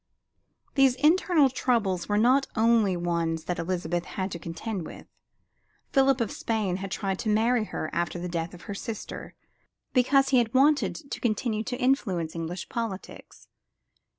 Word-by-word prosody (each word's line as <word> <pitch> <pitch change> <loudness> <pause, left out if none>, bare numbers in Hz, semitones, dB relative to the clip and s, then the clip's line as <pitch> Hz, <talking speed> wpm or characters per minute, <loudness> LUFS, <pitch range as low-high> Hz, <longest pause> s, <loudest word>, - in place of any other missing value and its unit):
These 270 -3 +4
internal 310 -1 +4
troubles 215 -9 0
were 205 - +2
not 255 +5 +4
the - - -2
only 225 -5 +3
ones 170 -2 -1
that 180 - -3
Elizabeth 175 0 -2
had 190 0 -4
to 170 - -5
contend 175 +4 -5
with. - - -11 0.9
Philip 270 -1 +4
of 225 - -1
Spain 215 -6 -1
had 195 +1 -5
tried 195 -1 -2
to 220 - -2
marry 225 +2 +2
her 155 - -4
after 175 +1 -1
the 175 +1 -4
death 170 0 -3
of 175 - -14
her 205 - -6
sister, 215 +2 -7 0.6
because 270 +2 +4
he 255 -3 +5
wanted 285 +3 +3 0.2
to - - -3
continue 220 -1 0
to 250 -1 -3
influence 210 - 0
English 170 +2 -4
politics. 225 -5 -6
215 Hz, 155 wpm, -27 LUFS, 175-250 Hz, 0.9 s, he